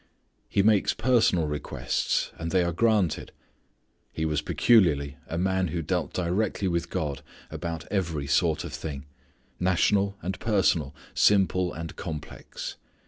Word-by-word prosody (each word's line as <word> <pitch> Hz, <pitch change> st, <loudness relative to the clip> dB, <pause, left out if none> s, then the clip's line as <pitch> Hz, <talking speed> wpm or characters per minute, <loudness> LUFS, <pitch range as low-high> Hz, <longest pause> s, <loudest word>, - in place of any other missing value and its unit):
He 100 Hz, -, +2 dB
makes 105 Hz, -2 st, +3 dB
personal 110 Hz, -8 st, +3 dB
requests 75 Hz, -1 st, -1 dB
and 80 Hz, 0 st, -3 dB
they 90 Hz, +1 st, +3 dB
are 85 Hz, -, 0 dB
granted. 105 Hz, -2 st, +1 dB, 0.8 s
He 80 Hz, -, -2 dB
was 75 Hz, -1 st, 0 dB
peculiarly 75 Hz, -, +3 dB
a 80 Hz, -, -4 dB
man 95 Hz, +1 st, +1 dB
who 85 Hz, 0 st, -3 dB
dealt 90 Hz, +3 st, -1 dB
directly 95 Hz, +3 st, -1 dB
with 85 Hz, -1 st, -1 dB
God 70 Hz, -4 st, -3 dB, 0.3 s
about 85 Hz, -2 st, -5 dB
every 85 Hz, -8 st, -1 dB
sort -, -, +2 dB
of -, -, -7 dB
thing, 70 Hz, -2 st, -5 dB, 0.5 s
national 100 Hz, +2 st, +2 dB
and 95 Hz, +1 st, -3 dB
personal, 95 Hz, -9 st, +1 dB, 0.2 s
simple 95 Hz, -3 st, +3 dB
and 80 Hz, 0 st, -7 dB
complex. 80 Hz, -4 st, -7 dB
90 Hz, 135 wpm, -27 LUFS, 80-95 Hz, 0.8 s, makes